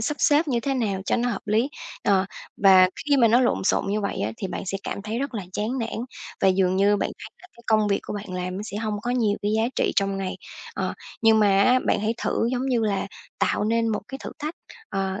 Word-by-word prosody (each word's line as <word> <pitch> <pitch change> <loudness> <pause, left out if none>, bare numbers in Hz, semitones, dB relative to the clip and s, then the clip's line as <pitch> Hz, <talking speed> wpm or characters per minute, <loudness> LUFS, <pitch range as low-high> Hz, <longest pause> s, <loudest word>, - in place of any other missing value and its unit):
sắp 295 +7 -1
xếp 300 +1 +4
như 240 -3 +1
thế 270 +2 -1
nào 205 -6 -1
cho - - +2
nó 245 +1 0
hợp 205 -5 -4
lý, 225 +6 +2 0.3
ờ, 195 -1 +3 0.3
và 190 -2 +7 0.2
khi 290 -1 +3
mà 235 -3 +5
nó 235 +3 +5
lộn 245 -6 +1
xộn - - +2
như 210 +2 0
vậy 200 - -3
á 105 +2 -1
thì 195 - -4
bạn - - -5
sẽ 195 +1 -2
cảm 200 - -5
thấy 220 +3 -3
rất 275 -2 -3
là 205 - -3
chán 220 +7 -2
nản 230 -2 -3 0.4
và 190 - +5
dường 185 0 +2
như 205 +1 +4
bạn - - -1
thấy - - -9
là - - -13
cái 235 - -16
công 215 -1 +3
việc 200 - +1
của - - -6
bạn 200 -2 -6
làm 180 0 -3
nó 205 - -4
sẽ 205 -1 -6
hông 215 -1 -2
có 240 - -2
nhiều 220 -5 +1
cái 205 - 0
giá 220 - +2
trị - - +1
trong 195 -1 +1
ngày. 190 -1 -3 0.4
Ờ, - - -2 0.3
nhưng 225 -1 +6
mà 200 -2 +4
á 250 +4 +5
bạn - - +2
hãy 220 +2 0
thử, 230 - +1
giống 255 +1 -1
như 240 -3 +2
là, 200 -2 0 0.3
tạo - - +1
nên 230 +1 +1
một 215 -2 -1
cái 270 - -6
thử - - -5
thách, 305 +3 -4 0.3
ờ, 195 +1 -2
215 Hz, 265 wpm, -24 LUFS, 195-240 Hz, 0.4 s, và